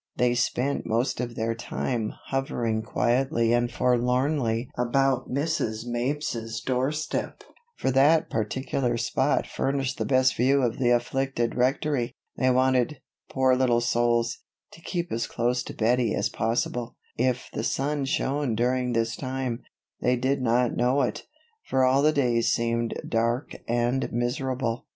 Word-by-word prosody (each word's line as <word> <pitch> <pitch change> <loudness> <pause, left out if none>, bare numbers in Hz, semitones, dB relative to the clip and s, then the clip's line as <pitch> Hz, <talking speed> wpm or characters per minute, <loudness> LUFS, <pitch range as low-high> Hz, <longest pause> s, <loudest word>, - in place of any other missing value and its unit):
They 125 0 +3
spent 125 +2 0
most 115 +3 0
of 120 -1 -3
their 115 0 -1
time 115 -1 -3 0.2
hovering 120 -4 -1
quietly 120 +1 +1
and 120 0 +1
forlornly 125 0 +1
about 130 +2 +1
Mrs. 130 -6 -1
Mapes's 120 -2 -2
doorstep, 135 +4 -2 0.3
for - - 0
that 150 +5 +4
particular 120 +2 -1
spot - - +1
furnished 135 -1 -2
the - - 0
best 130 -1 +3
view 135 +3 +3
of 120 0 -1
the 125 -2 +2
afflicted 120 0 0
Rectory. 130 0 0 0.2
They 130 - +2
wanted, 130 +2 +2 0.3
poor 130 -1 +3
little 125 -2 +3
souls, 120 0 +1 0.3
to 165 - -15
keep 175 0 -3
as 115 0 -1
close 120 +2 0
to - - -7
Bettie 115 0 +2
as - - 0
possible. 115 +1 -2 0.2
If 125 0 -1
the - - -3
sun 140 +3 -1
shone 135 -2 0
during 125 +1 +1
this 115 -1 0
time, 130 -3 -3 0.4
they 125 - +3
did 130 +2 0
not 120 0 +2
know 130 +3 +2
it; 125 - -3 0.4
for 130 - +2
all 130 +2 +4
the 155 +1 +4
days 120 -6 +2
seemed 115 0 0
dark 115 +3 0 0.2
and 120 +2 0
miserable. 125 0 -2
125 Hz, 140 wpm, -26 LUFS, 120-135 Hz, 0.4 s, that